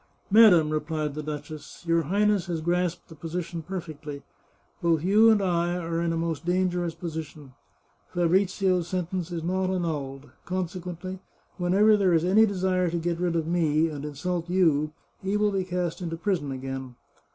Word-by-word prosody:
" - - -42
Madam," 190 -8 +7
replied 155 -1 -2
the 155 - -4
duchess, 150 +2 -7
" - - -15
your 165 0 +3
Highness 200 +3 +1
has 170 -2 -2
grasped 175 +1 -1
the - - -12
position 165 +2 -5
perfectly. 155 -5 -7 0.6
Both 165 -2 +2
you 210 +5 +6
and 215 -3 +4
I 175 -1 +1
are 165 -1 -2
in 170 -1 0
a 165 - -1
most 165 -3 -2
dangerous 175 -1 0
position. 155 -5 -7 0.6
Fabrizio's 185 0 +2
sentence 180 -1 -3
is 165 -2 -4
not 185 +2 0
annulled. 145 -7 -3
Consequently, 180 0 -4 0.4
whenever 200 +4 +4
there 195 -4 +3
is 165 +1 +2
any 215 +5 +5
desire 185 -2 +1
to 170 - -2
get 170 0 -2
rid 175 -1 0
of 165 -2 0
me, 165 -2 +2
and 145 -2 -6
insult 165 +4 -3
you, 160 -5 +2 0.3
he 195 +2 0
will 210 0 +2
be 195 -1 0
cast 180 -1 -3
into 165 -2 -4
prison 170 -6 -1
again. 130 -1 -6
175 Hz, 170 wpm, -26 LUFS, 160-185 Hz, 0.6 s, Madam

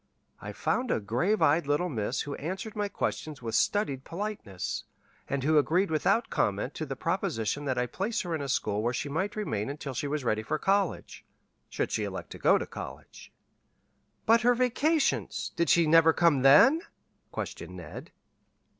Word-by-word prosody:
I - - -6
found 250 -1 -1
a - - +1
grave 125 - 0
eyed 150 +1 +3
little 145 +5 +1
miss 120 -5 -2
who 145 - -5
answered 190 - -5
my 205 -1 -1
questions 150 -7 -4
with 115 -1 -4
studied 140 - +1
politeness, 170 - -5 0.4
and 140 -2 -2
who 155 +1 +4
agreed 175 +5 +1
without 190 +9 +1
comment 105 +6 0
to 155 - -5
the 135 - -4
proposition 150 - -2
that 130 -2 -1
I 125 - +1
place 195 - -2
her 175 -3 -4
in 160 - -2
a 140 - -4
school 105 -4 0
where 120 +2 -1
she 145 +2 -3
might 190 +8 -2
remain 110 - -2
until 140 -1 -5
she 130 +3 -3
was 145 0 -2
ready 110 -2 0
for 110 +8 -2
college 195 +4 -1 0.5
should - - -2
she - - -1
elect - - -6
to - - -8
go - - +5
to - - -3
college." - - -10 0.9
"But 230 0 +5
her 245 +1 +4
vacations 275 +5 0
did 170 - +1
she 170 -1 +5
never 160 +1 +6
come 165 -6 +3
then?" 150 - +7 0.5
questioned - - -6
Ned. - - -9
155 Hz, 180 wpm, -29 LUFS, 130-200 Hz, 0.9 s, then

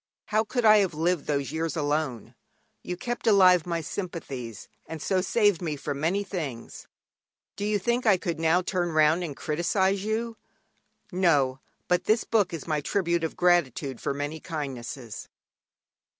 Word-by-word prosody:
How 215 +1 +2
could 245 +1 -2
I 215 0 +8
have 190 -6 +1
lived 170 0 0
those 140 -2 -1
years 160 +1 -2
alone? 145 -5 -2 0.5
You 180 - -5
kept 240 +3 -4
alive 185 -5 +6
my 170 -1 -1
sympathies, 140 - -6 0.2
and 160 - -6
so 185 +4 +1
saved 205 -2 +2
me 160 -4 -2
from 140 0 -4
many 180 +7 +1
things. 150 -12 -6 0.7
Do 205 - -3
you 210 0 +1
think 235 +5 0
I 200 -3 +6
could 170 -2 -3
now 165 +3 +3
turn 175 -1 -1
round 155 +3 +4
and 150 -5 -5
criticise 190 +5 0
you? 225 +2 -2 0.7
No; 145 -8 +2 0.3
but 180 0 +1
this 220 +2 +3
book 205 -5 +1
is 165 -4 -6
my 155 -2 0
tribute 170 +1 0
of 160 - -3
gratitude 150 -7 +1
for - - -1
many 145 +3 -4
kindnesses. 135 - -6
170 Hz, 160 wpm, -27 LUFS, 150-195 Hz, 0.7 s, I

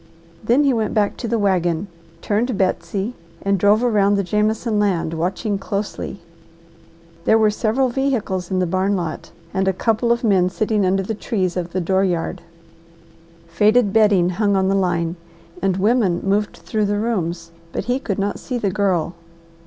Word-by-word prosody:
Then 240 +7 +3
he 275 -2 +3
went 220 -3 -1
back 205 -2 +1
to 235 - -4
the 230 +1 0
wagon, 185 -3 +1 0.4
turned 220 +2 0
Betsy, 195 +3 -1 0.3
and 200 -1 +1
drove 205 +4 +4
around 205 -4 +3
the 200 - +1
Jameson 210 +2 0
land 180 -6 0
watching 190 +5 -2
closely. 200 -1 -4 1.0
There 220 - +5
were 215 -1 +3
several 235 +5 +1
vehicles 240 -9 -1
in 190 - -1
the 185 - +2
barn 185 +3 0
lot, 170 -4 -4 0.2
and 190 0 0
a 190 - +3
couple 225 +4 +1
of 235 +1 +1
men 190 -5 +3
sitting 210 0 0
under 195 +1 +1
the 220 - -3
trees 190 -4 -2
of 175 -2 -3
the 185 - -1
door 190 +3 +1
yard. 175 -3 -1 1.0
Faded 205 +5 +3
bedding 205 -5 +4
hung 200 +2 +1
on 190 0 +2
the - - +2
line 175 -3 0 0.4
and 190 -1 +1
women 200 -3 +2
moved 205 +2 0
through 215 -2 -2
the 205 0 0
rooms, 175 -7 -2 0.2
but - - -4
he 250 +3 0
could 205 -7 -3
not 200 +1 -2
see 255 - -4
the 205 -5 -1
Girl. 185 -4 0
200 Hz, 175 wpm, -20 LUFS, 185-220 Hz, 1.0 s, There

